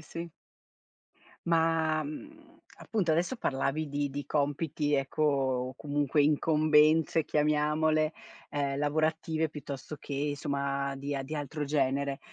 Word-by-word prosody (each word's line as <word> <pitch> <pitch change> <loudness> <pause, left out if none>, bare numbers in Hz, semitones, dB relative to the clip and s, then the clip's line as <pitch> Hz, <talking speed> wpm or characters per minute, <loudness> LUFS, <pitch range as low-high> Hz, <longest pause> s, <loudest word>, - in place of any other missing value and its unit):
sì. 165 +2 -7 1.2
Ma, 160 -1 +2
mhmm, 305 - -10 0.2
appunto 195 -7 -1
adesso 175 +10 0
parlavi 145 -1 -1
di 145 0 -1
di 145 +1 -5
compiti, 145 0 0
ecco, 135 +2 -1
o 130 -3 +1
comunque 145 0 +1
incombenze 155 +1 +4
chiamiamole, 150 +1 +2 0.4
ehm, 140 -1 -1
lavorative 155 +2 0
piuttosto 145 0 -7
che 145 +1 -2
insomma 140 -1 -2
di 140 +1 -4
a 135 - -2
di 150 +4 -6
altro 145 +1 -3
genere. 140 -1 0
150 Hz, 115 wpm, -30 LUFS, 140-155 Hz, 1.2 s, incombenze